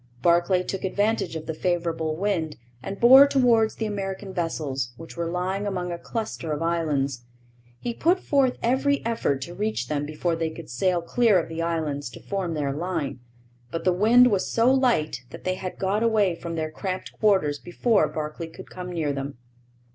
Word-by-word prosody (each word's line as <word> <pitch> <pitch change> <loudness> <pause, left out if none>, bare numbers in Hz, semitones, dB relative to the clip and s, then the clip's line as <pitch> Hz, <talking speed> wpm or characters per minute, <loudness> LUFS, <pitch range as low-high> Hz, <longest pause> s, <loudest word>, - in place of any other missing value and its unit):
Barclay 175 +2 +3
took 190 +1 -4
advantage 205 -2 0
of 160 -1 -5
the 160 - -3
favourable 165 -2 -1
wind 170 -4 -1 0.2
and 195 +8 -6
bore 265 +4 +9
towards 240 -5 +3
the 225 - -3
American 195 -2 -4
vessels, 140 -8 -2
which 165 0 -10
were 170 -1 -2
lying 185 +3 -2
among 180 -3 -2
a 170 - -4
cluster 220 -8 -4
of 150 +2 -2
islands. 145 -6 0 0.6
He 240 - -3
put 345 +9 +2
forth 275 -6 +2
every 265 +3 +1
effort 145 -12 0
to 175 - -8
reach 210 +4 -2
them 145 -1 -1
before 165 +3 -1
they 165 0 -1
could 160 0 -10
sail 175 +7 +1
clear 225 +2 +3
of 170 - -1
the 165 0 -4
islands 155 -5 -2
to - - -9
form 190 -4 -3
their 140 -2 -1
line. 160 -4 -3 0.5
But 165 - -4
the 185 - +3
wind 235 +6 +6
was 195 -2 0
so 235 +3 +4
light 230 - +1
that - - -10
they 185 - 0
had 185 0 -6
got 195 +3 0
away 215 -5 +3
from 170 0 -6
their 155 -1 -2
cramped 185 +3 -4
quarters 190 -9 +3
before 215 +5 +2
Barclay 155 +1 -5
could 185 +3 -12
come 180 -1 -6
near 155 -5 -1
them. 140 -1 -5
180 Hz, 185 wpm, -25 LUFS, 160-210 Hz, 0.6 s, bore